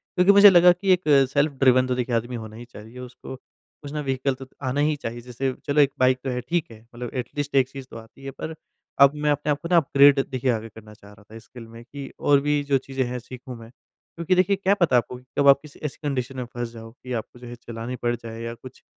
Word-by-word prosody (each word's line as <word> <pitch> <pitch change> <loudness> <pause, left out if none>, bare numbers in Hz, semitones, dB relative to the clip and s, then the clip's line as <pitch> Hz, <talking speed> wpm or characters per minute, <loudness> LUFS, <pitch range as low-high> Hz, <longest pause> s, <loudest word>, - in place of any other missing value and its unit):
क्योंकि 180 +2 +5
मुझे 200 0 +9
लगा 180 -1 +7
कि 190 +2 0
एक 180 - 0 0.3
सेल्फ 145 +1 +2
ड्रिवन 130 -1 +4
तो 125 - -1
देखिए 125 -1 -2
आदमी 120 +2 -2
होना 110 -1 -8
ही 120 +1 -10
चाहिए, 115 +1 -13
उसको 125 +1 -9
कुछ 145 +2 -16
ना 150 -1 -3
वेहिकल 135 0 -1
तो 135 0 -11 0.2
आना 130 +2 -1
ही 150 0 +2
चाहिए। 120 -3 -7
जैसे 125 +2 -3
चलो 145 +1 +3
एक 140 -1 +3
बाइक 130 0 +4
तो 135 - -3
है 125 0 -3
ठीक 170 -8 -1
है, 110 0 -14
मतलब 120 -1 -6
एटलीस्ट 140 +3 -4
एक 130 -1 +3
चीज़ 135 -1 -9
तो - - -8
आती 115 +4 -15
है, 135 - -5
पर 160 +3 -7 0.4
अब 140 0 +8
मैं 150 0 0
अपने 145 +1 -1
आप 145 - -1
को 170 - -5
ना 175 - +6
अपग्रेड 140 -2 +5
देखिए 130 -1 0
आगे 115 0 -4
करना 110 0 -14
चाह 100 -1 -17
रहा 105 - -19
था, 115 - -9
स्किल 115 +1 -13
में 115 +1 -13
कि 140 +2 -9
और 140 -1 +4
भी 145 0 +1
जो 140 -1 +2
चीज़ें 135 0 -3
हैं 125 +1 -4
सीखूँ 125 +1 -10
मैं। 115 - -12
क्योंकि 170 +7 -5
देखिए 185 +2 +3
क्या 195 +1 +1
पता 170 -10 +2
है - - +7
आपको 125 - -10
कि 125 - -17
कब 140 - +3
आप 140 0 +7
किसी 150 -2 -15
ऐसी 140 - -5
कंडीशन 130 -1 -3
में 125 - -4
फँस 120 -1 -4
जाओ, 115 -1 -11
कि 125 +1 -9
आपको 120 +1 -6
जो 125 - -11
है 120 - -8
चलानी 120 +1 -7
पड़ 120 -1 -1
जाए 115 0 -9
या 115 0 -5
कुछ 130 +2 -14
130 Hz, 265 wpm, -24 LUFS, 120-145 Hz, 0.4 s, मुझे